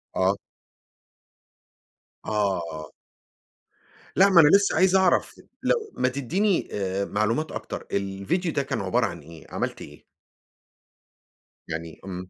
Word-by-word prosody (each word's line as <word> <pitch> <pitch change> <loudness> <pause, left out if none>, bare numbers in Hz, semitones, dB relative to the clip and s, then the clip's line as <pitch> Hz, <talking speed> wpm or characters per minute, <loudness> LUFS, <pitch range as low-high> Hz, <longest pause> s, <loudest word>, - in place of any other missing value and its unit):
آه. 95 +2 +2 1.9
آه. 85 -7 -2 1.2
لا 195 +2 +6
ما 180 -3 +8
أنا 150 - +6
لسّه 200 0 +3
عايز 185 +3 +4
أعرف 190 -1 +2 0.2
لو 440 -3 0
ما - - +2
تدّيني 175 - 0
آآ 100 -1 -2
معلومات 115 +11 -1
أكتر، - - -6
الفيديو 100 - -1
ده 140 - 0
كان 125 -5 -3
عبارة 95 -1 +1
عن - - -5
إيه، 80 -2 -13
عملْت - - -3
إيه؟ - - -12 1.6
يعني 80 0 -6
إمم. 90 -1 -6
105 Hz, 115 wpm, -25 LUFS, -, 1.9 s, ما